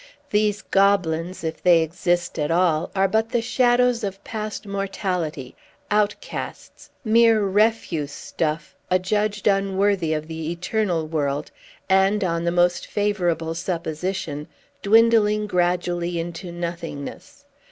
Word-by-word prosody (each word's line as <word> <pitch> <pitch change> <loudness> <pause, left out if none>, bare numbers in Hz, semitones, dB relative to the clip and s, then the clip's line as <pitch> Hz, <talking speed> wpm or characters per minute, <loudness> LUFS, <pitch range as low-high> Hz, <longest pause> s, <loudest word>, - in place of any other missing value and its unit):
These 210 -1 +1
goblins, 185 -3 +1
if 160 -1 -4
they 175 -2 +5
exist 175 +1 -1
at 150 - 0
all, 165 -2 +2
are 195 0 +3
but 220 +3 +1
the 240 - +1
shadows 245 0 +2
of 195 0 -4
past 215 -1 -5
mortality, 185 -8 -3 0.4
outcasts, 210 0 -3 0.2
mere 225 -1 +5
refuse 195 -7 +1
stuff, 155 +2 -3
adjudged 205 +3 0
unworthy 195 -3 +2
of 155 0 -3
the 160 -1 -5
eternal 180 -1 -1
world, 145 -2 -2 0.4
and, 195 +2 +3
on 170 -2 -1
the 170 - +2
most 175 0 +2
favorable 175 -6 0
supposition, 165 -2 -3 0.3
dwindling 215 -1 +4
gradually 175 -2 0
into 170 +1 -6
nothingness. 170 - -7
185 Hz, 115 wpm, -23 LUFS, 165-210 Hz, 0.4 s, they